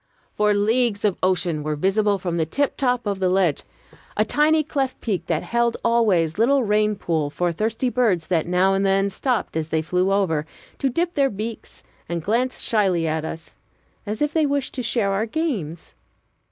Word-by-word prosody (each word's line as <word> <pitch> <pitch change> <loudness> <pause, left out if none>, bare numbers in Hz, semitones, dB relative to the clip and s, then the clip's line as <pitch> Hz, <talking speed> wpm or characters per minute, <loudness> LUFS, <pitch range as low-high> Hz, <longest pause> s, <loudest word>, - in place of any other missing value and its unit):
For 210 0 +2
leagues 215 +1 +1
of 200 -3 0
ocean 180 -4 +1
were 150 0 -2
visible 200 +5 +1
from 175 -2 -3
the 160 - +1
tiptop 250 - 0
of 200 -2 -2
the 185 -1 +2
ledge, 180 -5 +2 0.6
a 215 - +3
tiny 305 +6 +3
cleft 275 -3 -2
peak 205 -6 -3
that 160 -2 0
held 235 0 0
always 205 -8 +2
little 265 +4 +3
rain 210 0 +2
pool 160 -6 -1
for 175 +4 -1
thirsty 220 +8 -1
birds 220 -9 +1
that 170 -3 0
now 180 +2 +3
and 195 0 +1
then 195 0 +2
stopped 245 - -2
as 160 -1 -2
they 160 0 0
flew 180 +3 0
over, 165 -6 +1 0.3
to 270 - +1
dip 340 +7 -1
their 275 -4 +2
beaks 215 +2 -7 0.3
and 170 -2 -3
glance 240 +7 0
shyly 190 -7 +1
at 155 0 -1
us, 160 0 -7 0.5
as 215 +7 -1
if 295 0 -1
they 315 -2 +2
wished 280 -1 -1
to 255 - -3
share 230 -4 0
our 205 +3 0
games. 215 - -3
205 Hz, 185 wpm, -22 LUFS, 175-240 Hz, 0.6 s, a